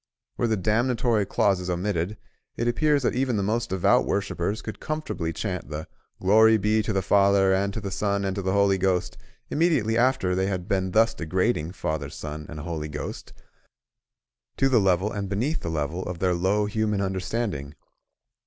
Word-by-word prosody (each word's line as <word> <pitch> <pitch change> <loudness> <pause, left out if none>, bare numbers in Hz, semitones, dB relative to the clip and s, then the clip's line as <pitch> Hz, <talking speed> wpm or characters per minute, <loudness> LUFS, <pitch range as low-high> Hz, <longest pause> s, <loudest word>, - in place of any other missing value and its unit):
Were 120 - 0
the 110 -1 +1
damnatory 115 +1 +1
clauses 95 -3 +1
omitted, 90 +2 -1 0.4
it 120 - -1
appears 145 +3 +2
that - - +1
even 125 -3 0
the 100 - 0
most 115 +3 -1
devout 95 -2 +3
worshippers 100 +1 -2
could 110 - -7
comfortably 125 - -3
chant 90 0 -4
the 80 0 -5 0.3
"Glory 110 +3 +5
be 105 +2 +2
to 110 - -2
the 95 -2 0
Father, 100 0 +4
and 100 +1 +1
to - - -2
the 100 -2 -5
Son, 100 0 -1
and 95 -1 -1
to 100 - -2
the 95 0 -1
Holy 100 -1 +3
Ghost" 90 -1 0 0.4
immediately 135 -9 +2
after 120 -7 +2
they 95 +1 0
had 90 -2 -3
been 95 -3 0
thus 115 +4 +3
degrading 90 -2 -1
Father, 80 -6 -3
Son, 75 +1 -7
and 75 -2 -7
Holy 80 -1 -4
Ghost 75 0 -6 1.3
to 135 - +3
the 125 -3 +4
level 95 +2 +2
and 100 -2 -4
beneath 125 +11 -1
the 85 - -5
level 80 +2 -2
of 90 -1 -4
their 90 +1 +1
low 95 +4 +1
human 105 0 -1
understanding. 95 -6 -3
100 Hz, 180 wpm, -25 LUFS, 90-110 Hz, 1.3 s, Glory